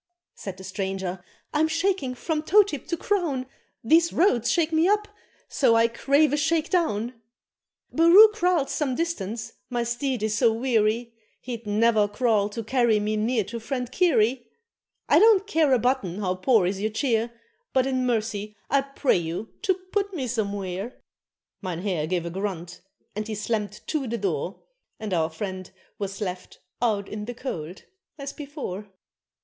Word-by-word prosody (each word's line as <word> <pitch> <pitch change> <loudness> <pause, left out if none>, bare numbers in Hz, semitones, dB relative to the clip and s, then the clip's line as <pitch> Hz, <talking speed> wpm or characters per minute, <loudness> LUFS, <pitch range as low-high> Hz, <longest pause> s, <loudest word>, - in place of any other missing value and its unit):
Said 190 -2 -7
the 190 - -10
stranger, 190 -1 -4 0.3
"I'm 310 +1 +3
shaking 330 -5 0
from 310 +4 -2
toe 410 +7 +6
tip 300 - -6
to 340 - -1
crown, 325 -10 -1 0.4
These 330 +7 +4
roads 245 - +2
shake 330 -1 +1
me 320 +2 +4
up, 420 +1 +2 0.4
so 245 -5 +3
I 230 0 +5
crave 280 +5 +2
a - - +2
shake 315 +1 +1
down! 245 - 0 0.8
Barroo 345 +7 +8
Kraal's 355 -8 +1
some 270 -4 -1
distance, 230 - -3 0.2
my 240 -2 -1
steed 240 0 -2
is 215 -1 0
so 235 0 +4
weary, 230 -1 +1 0.3
He'd 235 -3 -7
ne'er 215 0 +3
crawl 210 -1 +1
to 230 +2 -5
carry 235 -2 +2
me 210 +1 -1
near 220 +1 +1
to 230 +4 -6
friend 250 +1 -4
Cary. 250 - +2 0.6
I - - +6
don't 425 -3 +6
care 320 -8 +2
a 260 - +6
button 235 -7 0
how 190 -3 0
poor 185 +2 +3
is 190 +2 -2
your 215 - +1
cheer, 230 0 0 0.4
But 260 -1 +2
in 260 -1 0
mercy 215 -3 -1 0.2
I 275 - +4
pray 275 -3 +1
you 170 +6 -4
to 375 - +2 0.2
put 400 -2 -1
me 270 -6 -2
somewhere." 205 -2 -3 0.6
Mynheer 180 -3 -2
gave 175 0 -1
a 170 - -4
grunt, 180 -2 -5 0.3
and 215 +1 -3
he 220 - -3
slammed 210 0 -3
to 295 -5 -2
the 235 +1 -2
door, 185 -2 -3 0.4
And 215 -3 -4
our 160 -2 +1
friend 185 +2 -6 0.3
was 195 0 -4
"left 180 -2 -5 0.2
out 210 -4 +1
in 210 0 -6
the 245 +2 -6
cold" 180 - -6 0.3
as 280 -1 -6
before. 275 - -6
230 Hz, 165 wpm, -25 LUFS, 205-285 Hz, 0.8 s, Barroo